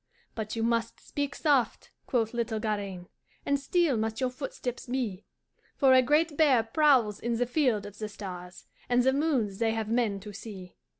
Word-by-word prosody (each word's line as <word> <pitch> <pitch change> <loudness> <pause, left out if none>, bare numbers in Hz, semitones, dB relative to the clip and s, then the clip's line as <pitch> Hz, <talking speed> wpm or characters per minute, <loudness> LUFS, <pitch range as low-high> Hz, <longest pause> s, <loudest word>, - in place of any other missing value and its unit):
"'But 220 -1 -4
you 225 - -1
must 230 0 0
speak 285 -1 -4
soft,' 280 -6 +1 0.2
quoth 225 -3 0
little 230 -2 -1
Garaine, 200 -5 -3 0.4
'And 280 0 +1
still 295 -1 +2
must 220 +1 -2
your 255 -1 0
footsteps 255 -2 -5
be, 240 -7 -3 0.5
For 270 -3 +5
a 260 - +7
great 300 +4 +2
bear 280 -7 +4
prowls 235 -4 +3
in 235 0 -1
the 245 - +1
field 245 -6 +1
of 205 0 -10
the 215 -1 -4
stars, 180 -3 -8 0.2
And 245 0 +4
the 265 +1 +3
moons 265 -10 0
they 225 -1 +2
have 220 -1 -3
men 230 -4 +1
to 210 0 -9
see. 195 -3 -9
235 Hz, 180 wpm, -29 LUFS, 215-265 Hz, 0.5 s, a